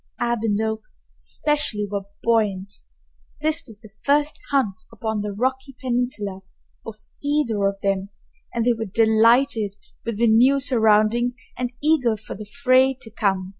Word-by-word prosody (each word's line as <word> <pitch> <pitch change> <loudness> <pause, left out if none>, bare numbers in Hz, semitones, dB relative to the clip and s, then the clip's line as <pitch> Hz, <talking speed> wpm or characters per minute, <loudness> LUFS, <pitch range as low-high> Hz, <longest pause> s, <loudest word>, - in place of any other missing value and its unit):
Ab 240 -1 0
and 210 -2 0
Oak 220 0 -1 0.3
especially 290 -9 -1
were 200 -1 -4 0.2
buoyant. 205 -4 +1 0.7
This 310 0 +1
was 220 -3 -12
the 215 -3 -14
first 290 +1 +1
hunt 225 -8 0
upon 220 -1 -3
the 205 0 -3
rocky 260 +5 -2
peninsula 240 -6 -2 0.4
of 225 - -8 0.3
either 270 -9 +1
of 195 0 -3
them, 195 0 -1 0.4
and 230 -1 -1
they 245 - +4
were 225 -1 -4
delighted 220 +1 +3 0.3
with 230 -3 -3
the 235 - +3
new 245 +5 +5
surroundings 235 -1 +3 0.2
and 245 -1 -3
eager 265 -8 +3
for 210 - -8
the 215 - -8
fray 265 +1 +3
to 225 - -9
come. 195 -4 0
225 Hz, 150 wpm, -23 LUFS, 210-255 Hz, 0.7 s, new